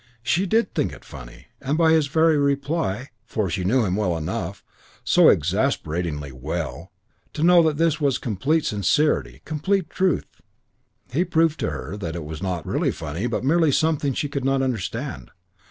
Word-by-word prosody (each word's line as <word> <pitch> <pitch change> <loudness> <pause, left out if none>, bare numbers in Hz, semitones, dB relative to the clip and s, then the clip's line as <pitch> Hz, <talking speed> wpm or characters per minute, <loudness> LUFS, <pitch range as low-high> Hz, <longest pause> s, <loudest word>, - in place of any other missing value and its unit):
She 175 +10 +1
did 225 +5 +1
think - - 0
it - - -13
funny; - - -11 0.2
and 140 +3 -1
by 165 -1 +4
his 160 -3 +3
very 160 +2 +3
reply 140 - -1
for 100 -5 -2
she 90 - -2
knew 115 +5 +2
him 95 -1 0
well 95 -5 0
enough, 85 +3 -4 0.4
so - - +6
exasperatingly 85 - 0
well, 75 +4 -5 0.4
to 155 - -2
know 175 0 +7
that 155 -3 +1
this 165 -1 +1
was 140 -3 +2
complete 140 - 0
sincerity, 105 - +1
complete 165 +3 -1
truth 185 -1 -1 0.7
he 165 +7 +2
proved 165 -3 +1
to - - -1
her 100 - -6
that 85 -5 -5
it 85 - -4
was 80 0 -7
not 90 -4 -3
really - - 0
funny 85 +11 -4
but 120 - -2
merely 160 +2 +3
something 145 -2 +1
she 145 - -1
could 140 -1 -4
not 135 0 +1
understand. 105 - -3
135 Hz, 170 wpm, -23 LUFS, -, 0.7 s, know